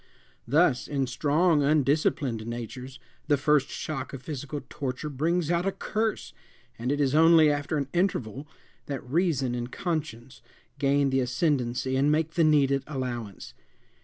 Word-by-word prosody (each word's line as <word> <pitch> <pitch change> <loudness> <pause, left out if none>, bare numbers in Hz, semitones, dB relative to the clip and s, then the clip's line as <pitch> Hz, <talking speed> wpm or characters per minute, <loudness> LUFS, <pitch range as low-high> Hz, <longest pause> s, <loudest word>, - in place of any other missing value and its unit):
Thus, 140 -2 +2
in 140 -2 -1
strong, 150 +5 +2
undisciplined 140 -5 +1
natures, 125 +3 -7 0.3
the 145 -2 +3
first 145 0 +2
shock 135 -4 -5
of 130 -1 -8
physical 145 -1 -5
torture 140 +2 -4
brings 165 +4 0
out 175 +2 +1
a - - +2
curse, 215 +3 -3 0.5
and 125 +3 -1
it 145 - -1
is 140 -2 +1
only 160 -1 +6
after 145 +1 -2
an 140 -2 -2
interval 145 - -1 0.4
that 135 -3 -5
reason 140 -4 0
and 120 0 -4
conscience 145 - -4 0.4
gain 140 -1 +2
the 135 - +2
ascendency 130 -1 0
and 140 +3 +3
make 155 +1 +1
the 170 0 +2
needed 140 -3 +3
allowance. 120 -7 -5
140 Hz, 145 wpm, -27 LUFS, 130-155 Hz, 0.5 s, only